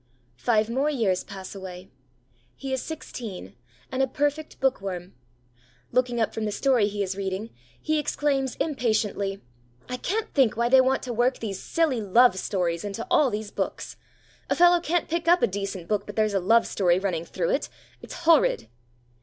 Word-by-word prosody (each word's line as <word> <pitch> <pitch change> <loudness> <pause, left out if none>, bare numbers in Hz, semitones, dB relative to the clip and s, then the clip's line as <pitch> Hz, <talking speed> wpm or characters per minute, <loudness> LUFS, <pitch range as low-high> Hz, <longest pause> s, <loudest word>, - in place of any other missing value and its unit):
Five 220 - +2
more 265 +6 0
years 215 -10 0
pass 195 -2 -9
away. 190 -1 -9 0.6
He 270 -1 -5
is 260 - -1
sixteen, 215 - -7 0.4
and 260 - 0
a 265 - +3
perfect 290 +3 -2
book 265 -5 +1
worm. 180 -2 -5 0.8
Looking 245 -1 +1
up 225 - 0
from 220 - -3
the 210 - -1
story 245 -2 +2
he 205 0 -2
is 190 0 -3
reading, 195 +3 -4 0.3
he 310 0 0
exclaims 275 -3 0
impatiently: 215 -8 -1 0.4
'I 250 - -4
can't 420 - -2
think 260 -7 +3
why 235 0 +2
they 260 +1 +7
want 260 +1 +1
to 245 - -4
work 245 +3 +2
these 200 -4 -5
silly 310 -8 0
love 210 0 +4
stories 175 -4 -1
into 205 +2 -4
all 290 -3 +5
these 210 -2 -4
books. - - -4 0.5
A - - +2
fellow 350 0 +6
can't 340 0 0
pick 335 +1 -2
up 350 +1 +5
a - - +6
decent 195 -3 -5
book 210 -2 -1
but 205 - -7
there's 215 -1 +1
a 195 - +2
love 225 +5 +4
story 180 -3 +2
running 185 -4 -1
through - - -2
it. - - -1 0.3
It's - - -9
horrid!' 315 - +4
225 Hz, 180 wpm, -26 LUFS, 195-270 Hz, 0.8 s, they